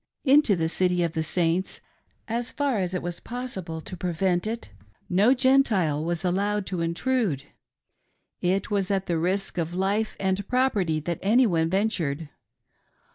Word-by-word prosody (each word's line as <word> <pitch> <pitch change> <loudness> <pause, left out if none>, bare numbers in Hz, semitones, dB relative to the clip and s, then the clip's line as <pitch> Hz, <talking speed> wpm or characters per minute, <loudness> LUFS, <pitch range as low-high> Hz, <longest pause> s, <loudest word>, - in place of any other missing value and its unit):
Into 270 -6 +5
the 165 -2 0
city 180 +1 +1
of 170 - 0
the 160 - -1
Saints, 170 +3 0 0.5
as 235 +2 -2
far 280 -6 0
as 185 -1 -2
was 175 0 -5
possible 190 -10 -5
to, 185 - -8
prevent 180 +2 0
it, 225 - -5 0.4
no 205 +8 +4
Gentile 220 - +3
was 170 +1 -2
allowed 200 +3 0
to 180 -2 -3
intrude. 170 - 0 1.0
It 190 +4 0
was 195 -2 0
at 195 -1 0
risk 180 +3 0
of 170 +1 -2
life 200 +4 0
and 190 +1 -1
property 210 -11 +1
that 170 +2 -3
any 235 +6 +4
one 165 -6 +1
ventured. 165 -7 -1
185 Hz, 145 wpm, -26 LUFS, 170-220 Hz, 1.0 s, Into